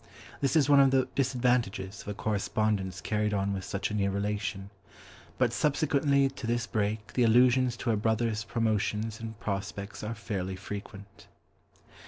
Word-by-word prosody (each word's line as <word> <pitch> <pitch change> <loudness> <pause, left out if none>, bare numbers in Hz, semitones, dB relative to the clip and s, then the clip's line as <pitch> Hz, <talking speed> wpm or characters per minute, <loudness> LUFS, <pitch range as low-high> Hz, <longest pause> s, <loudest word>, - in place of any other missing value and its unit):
This 140 +3 +1
is 150 -4 +4
one 145 -1 +6
of 135 -1 +6
the 130 -1 +2
disadvantages 120 -7 0
of - - -15
a 105 - -3
correspondence 100 -3 -1
carried 105 -1 0
on 100 0 0
with 95 -1 -4
such 100 +2 -3
a - - -3
near 100 -2 +1
relation. 100 0 -3 0.7
But 125 -2 +2
subsequently 140 0 +2
to 130 -3 -7
this 120 0 0
break 105 -1 -2
the 125 - +1
allusions 125 +1 +4
to 120 - -1
her - - +2
brothers' 110 0 0
promotions 110 -1 -1
and 110 -1 -7
prospects 100 -1 -4
are 110 +2 -3
fairly 95 -3 -4
frequent. 100 +1 -9
110 Hz, 160 wpm, -29 LUFS, 100-125 Hz, 0.7 s, one